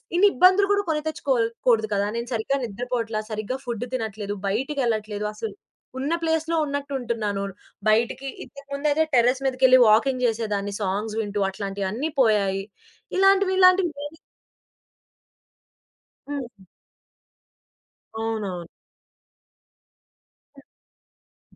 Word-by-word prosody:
ఇన్నిబ్బందులు 380 +1 +5
గూడా 405 0 +2
కొని 305 -1 0
తెచ్చుకోల్‌ 265 -7 0 0.2
కూడదు 220 -2 +4
కదా! 200 0 +1
నేను 235 - -3
సరిగ్గా 230 +5 0
నిద్రపోవట్లా, 230 0 -3
సరిగ్గా 215 +5 -3
ఫుడ్ 240 -1 -3
తినట్లేదు, 210 -3 -4
బయటికెళ్ళట్లేదసలు 215 -4 -2 0.4
ఉన్న 285 +5 -1
ప్లేస్‌లో 320 +1 0
ఉన్నట్టుంటున్నాను. 240 -8 -2 0.5
బయటకి 235 +5 +1 0.2
ఇంతకు 280 -1 -14
ముందయితే 295 +2 +2
టెర్రేస్ 250 +2 +3
మీదకెళ్లి 255 0 +5
వాకింగ్ 250 +4 +3
చేసేదాన్ని 210 -3 -2
సాంగ్స్ 205 +3 -2
వింటూ 205 -1 -3
అట్లాంటియన్ని 200 +8 -3
పోయాయి. 200 -4 +2 0.5
ఇలాంటివిలాంటివి 380 -2 +5
దేని 295 +2 -7 2.1
హ్మ్. 285 -3 -3
హ్మ్. 190 - -19 1.5
అవునవును. 210 -6 -3 1.9
హ్మ్. 275 - -26
235 Hz, 90 wpm, -24 LUFS, 210-285 Hz, 2.1 s, ఇన్నిబ్బందులు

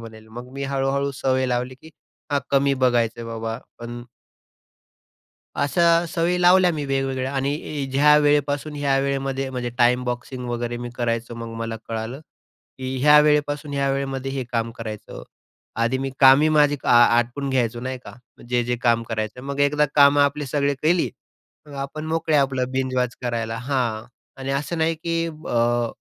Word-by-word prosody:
म्हणेल. 110 -1 -12
मग 120 +3 -10
मी 140 +1 -4
हळू-हळू 140 +1 -1
सवय 130 -1 +1
लावली 125 +1 -2
की 160 - -13 0.4
हा 145 - +3
कमी 140 0 +3
बघायचं 120 -3 +1
आहे 115 - -6
बाबा, 115 0 -4 0.2
पण 120 0 -7 1.6
अशा 170 +4 +3
सवयी 175 +2 0
लावल्या 180 0 +6
मी 150 -2 -3
वेगवेगळ्या 135 -1 -1
आणि 140 +1 -2
ज्या 150 +2 +5
वेळेपासून 145 0 +1
ह्या 140 -2 +1
वेळेमध्ये 135 -1 -2
म्हणजे 125 -2 -3
टाईम 125 0 +3
बॉक्सिंग 125 +1 -4
वगैरे 120 0 -3
मी 120 0 -6
करायचं. 120 0 -2
मग 115 -1 -7
मला 115 0 -4
कळालं 115 +4 -4 0.6
की 130 0 -4
ह्या 150 +1 +7
वेळेपासून 150 -1 +1
ह्या 140 0 0
वेळेमध्ये 135 -1 -3
हे 135 -2 -3
काम 115 -1 -1
करायचं. 110 -2 -8 0.5
आधी 115 +3 +1
मी 135 0 -3
कामी 135 +4 +7
माझी 150 -1 +4
आ - - +4 0.2
आटपून 125 +4 -1
घ्यायचो 120 -3 0
नाही 130 +1 -4
का - - -9 0.4
जे 120 -1 +1
जे 120 +1 -1
काम 115 -1 +2
करायचं. 110 +2 -3
मग 140 0 -5
एकदा 150 +1 +3
कामं 145 0 +6
आपले 145 +1 +1
सगळे 140 +1 0
केली, 170 +2 +2 0.6
मग 145 - -11
आपण 155 +3 -6
मोकळे 160 -1 0
आपलं 130 -2 +1
बिंजवॉच 130 -2 -1
करायला. 115 -2 -2
हां, 125 -4 -2 0.4
आणि 135 +1 -3
असं 145 +5 -2
नाही 160 +1 +1
की 165 +1 -2
अ, 120 -6 0
135 Hz, 165 wpm, -23 LUFS, 120-145 Hz, 1.6 s, ह्या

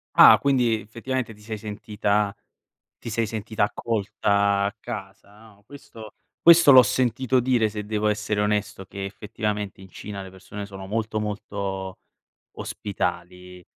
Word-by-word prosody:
Ah, - - +9
quindi 120 -6 +1
effettivamente 120 +1 -3
ti 105 - -19
sei 110 0 -6
sentita 105 -1 -1 0.6
ti - - -8
sei 115 +1 0
sentita 110 0 -2
accolta, 100 -2 0
a 100 +1 -1
casa, 100 +1 -9
no. 105 -2 -19
Questo 110 -6 -12 0.3
questo 170 -3 +8
l'ho 130 -1 +10
sentito 130 +2 +1
dire, 120 -3 +2
se 105 0 -6
devo 105 0 -1
essere 105 0 -1
onesto, 105 -2 -1
che 95 +1 -7
effettivamente 105 0 -4
in 95 - -13
Cina 100 +2 -7
le 95 - -9
persone 95 +2 -9
sono 95 -1 -9
molto, 110 +1 -2
molto 100 -2 -4 0.6
ospitali. 90 -2 -5
105 Hz, 140 wpm, -24 LUFS, 100-110 Hz, 0.6 s, l'ho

